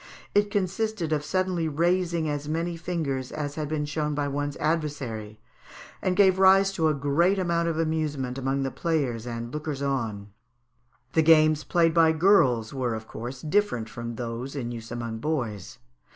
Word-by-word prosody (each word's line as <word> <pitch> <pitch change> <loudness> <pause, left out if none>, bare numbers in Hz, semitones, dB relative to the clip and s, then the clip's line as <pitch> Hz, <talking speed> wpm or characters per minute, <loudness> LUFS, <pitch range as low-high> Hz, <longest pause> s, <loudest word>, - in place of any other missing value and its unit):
It 205 0 +3
consisted 200 -3 -1
of 150 -1 0
suddenly 180 +1 0
raising 170 +1 +1
as 145 0 -3
many 165 +2 -1
fingers 160 -7 -3
as 145 -2 -4
had 150 0 -3
been 155 -1 -1
shown 150 0 -2
by 145 -1 -1
one's 145 +1 -3
adversary, 140 -9 -2 0.6
and 185 -1 0
gave 190 -2 +4
rise 195 +1 +6
to 165 -5 +1
a 155 - +2
great 150 +8 +2
amount 170 -2 0
of 165 -1 -1
amusement 150 -5 -1
among 135 +1 -1
the 135 - -2
players 135 -9 -1
and 120 0 -5
lookers 150 -2 -4
on. 110 -7 -2 0.8
The 160 - +4
games 155 -1 +5
played 165 -2 +2
by 165 -1 +5
girls 155 - +3
were, 125 -4 -1
of 110 0 -7
course, 125 +3 -7
different 155 - 0
from 120 +1 -6
those 120 +3 -5
in 120 -4 -3
use 115 -1 -7
among 115 -1 -4
boys. 120 - -3
150 Hz, 165 wpm, -26 LUFS, 125-170 Hz, 0.8 s, rise